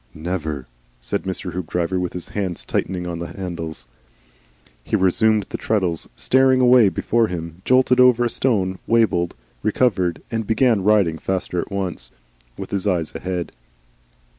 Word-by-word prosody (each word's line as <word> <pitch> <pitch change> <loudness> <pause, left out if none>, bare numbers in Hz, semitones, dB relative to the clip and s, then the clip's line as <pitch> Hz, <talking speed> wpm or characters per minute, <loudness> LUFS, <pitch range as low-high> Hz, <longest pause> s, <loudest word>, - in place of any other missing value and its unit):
"Never!" 80 -4 -4 0.3
said - - -3
Mr. 95 -1 -4
Hoopdriver 90 +1 -2
with 90 -1 -3
his 90 - -5
hands 95 -4 -3
tightening 90 -1 -2
on 85 -1 -4
the 85 - -4
handles. 85 -7 -6 1.0
He 110 - -1
resumed 105 +2 +3
the - - -5
treadles, 95 -7 -1
staring 130 0 +3
away 125 -4 +6
before 115 +4 +1
him, 85 -1 -6
jolted 130 0 +4
over 125 -1 +6
a - - +3
stone, 95 -8 0
wabbled, 105 -7 +2 0.3
recovered, 100 -6 +1
and 115 -2 -2
began 110 -3 +2
riding 95 -6 +3
faster 95 -2 -2
at - - -9
once, 95 -10 -3 0.5
with - - -7
his 100 0 -1
eyes 85 -5 0
ahead. 90 -2 -4
95 Hz, 145 wpm, -21 LUFS, 85-110 Hz, 1.0 s, away